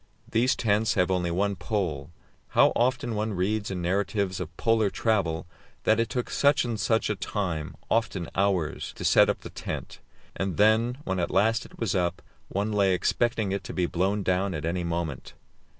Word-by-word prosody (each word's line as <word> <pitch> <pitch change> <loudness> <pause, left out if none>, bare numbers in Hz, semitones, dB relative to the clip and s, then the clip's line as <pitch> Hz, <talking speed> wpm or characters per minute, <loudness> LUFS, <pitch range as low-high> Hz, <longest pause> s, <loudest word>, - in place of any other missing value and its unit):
These 120 +3 +3
tents 110 0 +1
have 90 +1 +2
only 90 -2 +1
one 100 +4 0
pole. 90 - -2 0.5
How - - +6
often 125 0 +1
one 110 0 -1
reads 105 +4 0
in 90 -2 -3
narratives 95 +1 0
of 85 -2 -7
Polar 115 -2 +2
travel 95 -8 0 0.4
that 110 - +3
it 115 - +1
took 125 -1 -3
such 140 -2 +3
and 115 -3 -3
such 110 +2 +1
a 105 - 0
time 90 -7 -3
often 105 -7 0
hours 95 -5 0
to - - -6
set - - +6
up - - -1
the - - -9
tent, - - -6 0.4
and 95 -2 -2
then, 110 +4 +3
when 95 -10 -2
at 85 - 0
last 115 +2 +2
it - - -18
was 115 -4 -1
up, 90 -1 -1 0.2
one 100 +3 -2
lay 100 -3 +3
expecting 110 +3 0
it 100 - -2
to - - -6
be 90 - +1
blown 95 +4 0
down 95 0 0
at 75 -1 -4
any 85 +2 -1
moment. 85 -5 -4
100 Hz, 185 wpm, -27 LUFS, 90-110 Hz, 0.5 s, How